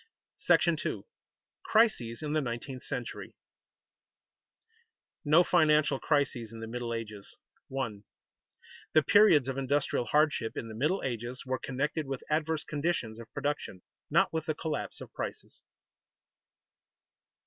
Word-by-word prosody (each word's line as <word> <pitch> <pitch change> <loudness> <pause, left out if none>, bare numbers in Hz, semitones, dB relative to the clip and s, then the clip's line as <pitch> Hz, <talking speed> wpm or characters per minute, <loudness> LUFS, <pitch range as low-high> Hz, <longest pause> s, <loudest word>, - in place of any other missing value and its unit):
§ - - +4
II. - - -2 0.6
CRISES 175 - +2
IN 150 0 -2
THE 155 - +2
NINETEENTH 125 +1 -5
CENTURY - - -6 1.8
[Sidenote: - - -62
No 155 +4 +6
financial 155 -5 +3
crises 135 -6 0
in 115 - -9
the 115 - -5
Middle 120 +1 -4
Ages] 110 -3 -6 0.3
1. 115 -7 -4 0.9
_The 155 - +6
periods 205 - +6
of 135 0 -2
industrial 135 -2 0
hardship 150 -6 +1
in 115 - -4
the - - -7
Middle 150 - 0
Ages 120 0 -4
were 130 0 -1
connected 145 +3 -2
with 135 -1 -4
adverse 155 0 0
conditions 145 -8 -2
of 115 - -11
production, 140 -10 -3 0.3
not - - +3
with 160 -1 -2
the 155 - 0
collapse 155 -2 -4
of - - -10
prices. - - -6
135 Hz, 130 wpm, -30 LUFS, 120-155 Hz, 1.8 s, No